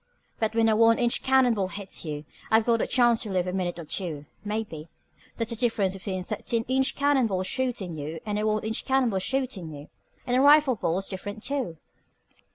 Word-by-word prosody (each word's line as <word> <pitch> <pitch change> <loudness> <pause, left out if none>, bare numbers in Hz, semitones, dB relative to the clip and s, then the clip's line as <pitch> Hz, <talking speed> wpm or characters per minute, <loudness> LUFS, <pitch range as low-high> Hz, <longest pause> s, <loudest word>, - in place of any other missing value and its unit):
But 220 0 0
when 225 -1 +4
a 220 - +4
one 230 +1 +5
inch 240 -1 +1
cannon 260 -2 +4
ball 195 -4 -1
hits 195 0 -5
you, 150 -2 -5 0.3
you've 220 0 +5
got 230 -1 +2
a - - 0
chance 240 -3 +3
to 215 - -3
live 185 -2 0
a 180 - -3
minute 180 -2 -2
or 170 - -7
two, 155 -3 -4 0.2
maybe. 205 -7 -4 0.5
That's 230 0 -2
the - - -1
difference 220 -5 +1
between 190 -1 -4
a - - -6
thirteen 230 +4 -2
inch 265 +1 +1
cannon 280 -4 +3
ball 185 -3 -1
shootin' 220 -6 -2
you, 155 +2 -5
and 210 -1 -1
a 215 - 0
one 215 0 0
inch 220 +1 -2
cannon 265 -3 +2
ball 190 - 0
shootin' 245 -6 -2
you. 145 -1 -10 0.4
And 245 -1 0
a 255 - +4
rifle 290 -1 +6
ball 170 -4 -1
is 195 - -3
different, 205 +2 -6
too." 265 - -2
215 Hz, 220 wpm, -26 LUFS, 185-245 Hz, 0.5 s, rifle